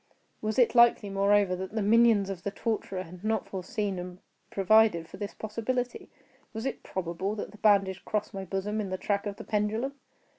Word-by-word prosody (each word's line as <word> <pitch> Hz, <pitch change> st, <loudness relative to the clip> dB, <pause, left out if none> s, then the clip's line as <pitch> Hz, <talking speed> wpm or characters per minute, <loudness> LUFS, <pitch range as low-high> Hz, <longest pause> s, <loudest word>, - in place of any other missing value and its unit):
Was 215 Hz, 0 st, -2 dB
it 245 Hz, -3 st, +4 dB
likely, 235 Hz, -4 st, +5 dB
moreover, 200 Hz, -1 st, +3 dB
that 190 Hz, +2 st, -6 dB
the 220 Hz, -, 0 dB
minions 215 Hz, -2 st, +4 dB
of 185 Hz, -2 st, -6 dB
the 200 Hz, -, -2 dB
torturer 195 Hz, -3 st, -3 dB
had 180 Hz, +2 st, -12 dB
not 220 Hz, -1 st, 0 dB
foreseen 195 Hz, +1 st, -3 dB
and 180 Hz, 0 st, -7 dB, 0.3 s
provided 195 Hz, -4 st, +4 dB
for -, -, -11 dB
this 205 Hz, -1 st, -5 dB
possibility? 245 Hz, +3 st, -3 dB, 0.4 s
Was 225 Hz, +2 st, -5 dB
it 270 Hz, -, -3 dB
probable 190 Hz, +3 st, -3 dB
that 210 Hz, -, -5 dB
the 210 Hz, -, -15 dB
bandage 195 Hz, -3 st, +3 dB
crossed 210 Hz, 0 st, -2 dB
my 195 Hz, -1 st, -4 dB
bosom 195 Hz, +3 st, -2 dB
in 200 Hz, -, -4 dB
the 185 Hz, -, -2 dB
track 200 Hz, +2 st, -1 dB
of 200 Hz, -, -4 dB
the -, -, -9 dB
pendulum? 220 Hz, +5 st, -1 dB
205 Hz, 190 wpm, -29 LUFS, 190-220 Hz, 0.4 s, likely